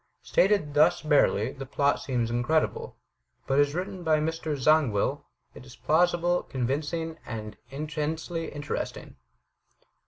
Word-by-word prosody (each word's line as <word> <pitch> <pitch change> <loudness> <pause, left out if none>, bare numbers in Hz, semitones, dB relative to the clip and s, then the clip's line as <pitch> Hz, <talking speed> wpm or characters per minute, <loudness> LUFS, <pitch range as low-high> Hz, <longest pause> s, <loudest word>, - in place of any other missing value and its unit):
Stated 185 -6 +2
thus 150 +2 +4
barely, 135 -6 +3
the 135 -1 -8
plot 140 +1 +1
seems 120 -3 -1
incredible; 120 +7 0 0.5
but 135 +1 +1
as 145 +1 +2
written 185 0 -4
by 160 -2 +3
Mr. 155 -1 -2
Zangwill, 135 -7 +2 0.3
it - - -12
is 130 -1 -13
plausible, 175 +2 +2
convincing, 155 +6 -3
and 110 -2 -6
intensely 155 +3 -4
interesting. 145 0 -5
150 Hz, 120 wpm, -27 LUFS, 135-160 Hz, 0.5 s, thus